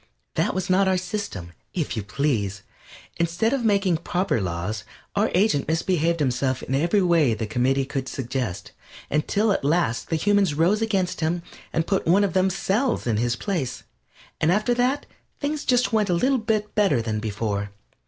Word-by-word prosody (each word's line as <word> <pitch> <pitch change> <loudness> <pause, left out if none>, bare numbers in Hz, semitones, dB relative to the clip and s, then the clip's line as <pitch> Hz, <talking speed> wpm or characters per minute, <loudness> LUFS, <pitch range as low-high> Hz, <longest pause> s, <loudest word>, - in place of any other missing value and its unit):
that - - 0
was 190 -1 -1
not 190 +1 +3
our 190 -1 +3
system, 180 - -5 0.2
if 165 -7 -1
you 110 - -2
please. 100 -3 -1 0.5
Instead 170 +8 +1
of 270 -3 0
making 200 -5 +2
proper 175 - -1
laws 90 +4 -3 0.3
our 210 +2 +2
agent 180 -7 +2
misbehaved 165 +1 +1
himself 130 -1 0
in - - -4
every 170 +8 +2
way 165 -9 +3
the 110 - -3
committee 130 +5 +1
could 135 -1 -4
suggest, 120 -7 -4 0.4
until 200 +9 +1
at 195 - 0
last 150 -4 +1
the 165 - +1
humans 200 -1 +2
rose 180 +8 +2
against 195 -6 0
him 170 +2 0 0.3
and 165 0 0
put 195 -2 0
one 190 +5 +5
of 200 - 0
themselves 190 +6 +1
in 115 -3 +1
his 120 +1 +1
place, 150 -5 -3 0.6
and 160 - +3
after 215 +5 +2
that 250 +4 +1 0.3
things 295 0 -2
went - - -11
just 235 -5 +2
a - - +3
little 270 -1 +2
better 210 - +1
than 110 -2 -2
before. 100 -1 -2
170 Hz, 170 wpm, -24 LUFS, 125-200 Hz, 0.6 s, one